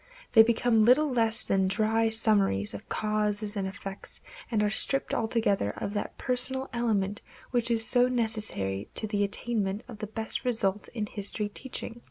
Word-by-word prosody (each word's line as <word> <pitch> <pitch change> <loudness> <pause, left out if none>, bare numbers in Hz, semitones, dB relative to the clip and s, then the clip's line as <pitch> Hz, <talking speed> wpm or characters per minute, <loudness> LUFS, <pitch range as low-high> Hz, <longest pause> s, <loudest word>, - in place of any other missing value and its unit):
They 225 - +8
become 225 0 +3
little 270 +6 +4
less 230 -2 +4
than 190 -1 +1
dry 225 +3 +1
summaries 200 - +2
of 100 - -9
causes 210 0 -1
and 195 -2 -2
effects 195 0 -9 0.3
and 215 -3 +1
are 210 - +2
stripped 275 +5 0
altogether 220 - 0
of 200 - -4
that 205 - -4
personal 260 +1 0
element 210 -3 -1 0.3
which 240 -2 0
is 225 -1 +1
so 245 0 +3
necessary 215 - -1
to - - 0
the 205 -1 0
attainment 205 0 -1
of 230 -4 -10
the 215 - -5
best 220 +4 -2
results 210 -5 0
in 220 -3 -4
history 205 0 -2
teaching. 240 +1 -5
220 Hz, 165 wpm, -28 LUFS, 200-235 Hz, 0.3 s, They